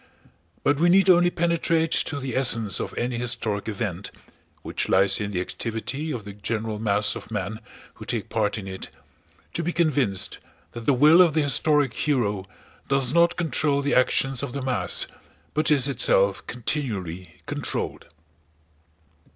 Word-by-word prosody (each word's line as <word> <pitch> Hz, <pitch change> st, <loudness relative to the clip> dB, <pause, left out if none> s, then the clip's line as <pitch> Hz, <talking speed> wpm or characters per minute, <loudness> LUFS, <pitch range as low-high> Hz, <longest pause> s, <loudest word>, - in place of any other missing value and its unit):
But 145 Hz, 0 st, +2 dB
we 175 Hz, +2 st, +4 dB
need 190 Hz, +1 st, +6 dB
only 175 Hz, 0 st, +5 dB
penetrate 165 Hz, -1 st, 0 dB
to 145 Hz, -, 0 dB
the 130 Hz, -3 st, -5 dB
essence 115 Hz, -7 st, +2 dB
of -, -, -5 dB
any 120 Hz, 0 st, -2 dB
historic 115 Hz, -4 st, -1 dB
event—which 100 Hz, -3 st, -6 dB
lies 95 Hz, +1 st, +3 dB
in 105 Hz, -, -2 dB
the 95 Hz, -3 st, -2 dB
activity 120 Hz, -, -4 dB
of 115 Hz, -6 st, -5 dB
the 100 Hz, -, -8 dB
general 110 Hz, +1 st, -3 dB
mass 105 Hz, -1 st, +1 dB
of -, -, -9 dB
men 105 Hz, 0 st, -4 dB, 0.3 s
who -, -, -11 dB
take -, -, -3 dB
part 105 Hz, -1 st, -1 dB
in 100 Hz, -2 st, -7 dB
it—to 95 Hz, -, -9 dB
be 170 Hz, +1 st, -1 dB
convinced 140 Hz, -, 0 dB, 0.3 s
that 115 Hz, -1 st, -9 dB
the 140 Hz, -, +4 dB
will 155 Hz, +7 st, +7 dB
of 170 Hz, -4 st, +4 dB
the 155 Hz, -, +3 dB
historic 145 Hz, -1 st, +3 dB
hero 105 Hz, -10 st, -1 dB, 0.4 s
does 135 Hz, -1 st, +2 dB
not 170 Hz, 0 st, +3 dB
control 145 Hz, -3 st, +1 dB
the 145 Hz, -, 0 dB
actions 130 Hz, 0 st, +2 dB
of 140 Hz, -3 st, -5 dB
the 140 Hz, -, -4 dB
mass 130 Hz, -1 st, +1 dB, 0.5 s
but 155 Hz, -, +1 dB
is 140 Hz, -3 st, +4 dB
itself 100 Hz, -7 st, +2 dB
continually 105 Hz, -, -4 dB
controlled. -, -, -4 dB
125 Hz, 150 wpm, -24 LUFS, 105-150 Hz, 0.5 s, will